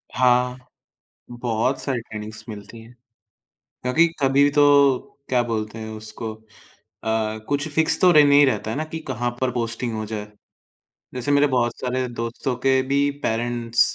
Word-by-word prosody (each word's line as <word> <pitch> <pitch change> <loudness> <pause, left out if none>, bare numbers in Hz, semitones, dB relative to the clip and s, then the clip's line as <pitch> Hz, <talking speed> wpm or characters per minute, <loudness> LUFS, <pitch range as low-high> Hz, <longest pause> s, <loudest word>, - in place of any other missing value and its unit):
हाँ, 125 0 +3 0.7
बहुत 120 +2 -1
सारी 130 -4 -2
ट्रेनिंगस 110 -1 -8
मिलती 105 +2 -9
है। 115 +2 -15 0.9
क्योंकि 160 +7 +4
कभी 140 +1 +4
तो 145 -2 +5 0.3
क्या 125 -1 +3
बोलते 110 -1 -3
हैं 110 0 -6
उसको 110 +1 -7 0.7
अ, 110 -1 -1
कुछ 145 +1 0
फ़िक्स 160 0 +2
तो 180 - +6
रह 150 -2 +7
नही 145 0 +6
रहता 130 -4 0
है 115 - -3
ना 155 - -1
कि 160 - -4
कहाँ 120 -1 -1
पर 130 - +1
पोस्टिंग 115 -1 -2
हो 110 - -3
जाए। 105 -1 -5 0.9
जैसे 125 +3 -2
मेरे 145 +1 +4
बहुत 120 -1 +1
सारे 130 0 -1
दोस्तों 120 +2 -3
के 130 0 +4
भी 140 +1 +2 0.2
पेरेंट्स 115 0 0
125 Hz, 155 wpm, -22 LUFS, 115-135 Hz, 0.9 s, रह